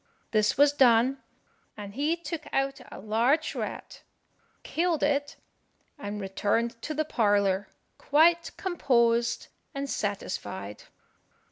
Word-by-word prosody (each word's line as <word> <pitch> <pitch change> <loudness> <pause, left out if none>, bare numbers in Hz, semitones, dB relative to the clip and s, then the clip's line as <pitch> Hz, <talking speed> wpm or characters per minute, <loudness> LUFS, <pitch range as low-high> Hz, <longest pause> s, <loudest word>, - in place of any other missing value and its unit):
This 215 0 +2
was 285 +1 +5
done, 255 0 +4 0.6
and 200 -1 -8
he 295 +7 0
took 335 -2 -7
out 270 0 -1
a - - -8
large 235 +9 +1
rat, - - -6 0.6
killed 335 -1 0
it, 285 0 0 0.6
and 210 -4 -5
returned 210 +4 -1
to 310 - -4
the 310 +1 0
parlour 205 -6 +1 0.3
quite 335 +3 +3
composed 235 -9 +1 0.3
and 275 0 -3
satisfied. 190 - -4
245 Hz, 110 wpm, -28 LUFS, 210-295 Hz, 0.6 s, was